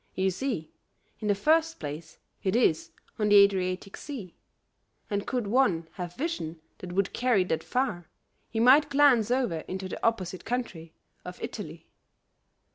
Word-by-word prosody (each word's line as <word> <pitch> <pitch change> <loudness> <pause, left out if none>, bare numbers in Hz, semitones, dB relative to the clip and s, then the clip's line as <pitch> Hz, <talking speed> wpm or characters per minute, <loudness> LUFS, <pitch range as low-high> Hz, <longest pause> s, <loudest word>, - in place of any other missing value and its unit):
You 190 0 +1
see, 190 - -4 0.5
in 215 - -4
the 205 - +3
first 320 +9 +2
place, 155 +2 -7 0.2
it 190 +2 0
is 200 -10 +2 0.3
on 210 -1 +2
the 205 - +6
Adriatic 195 -1 +3
Sea, 235 - -8 0.8
and 205 0 -2
could 250 -4 -1
one 200 -8 +2
have 175 -2 -7
vision 255 - -3 0.2
that 180 - -7
would 195 +1 0
carry 245 -6 +2
that 160 -3 -2
far, 210 -10 -2 0.4
he 225 - -3
might 265 +6 +6
glance 275 -6 +4
over 245 -10 0
into 190 0 -4
the - - -7
opposite 190 -5 -1
country 190 -10 -4 0.3
of - - -9
Italy. - - -7
200 Hz, 150 wpm, -28 LUFS, 180-250 Hz, 0.8 s, the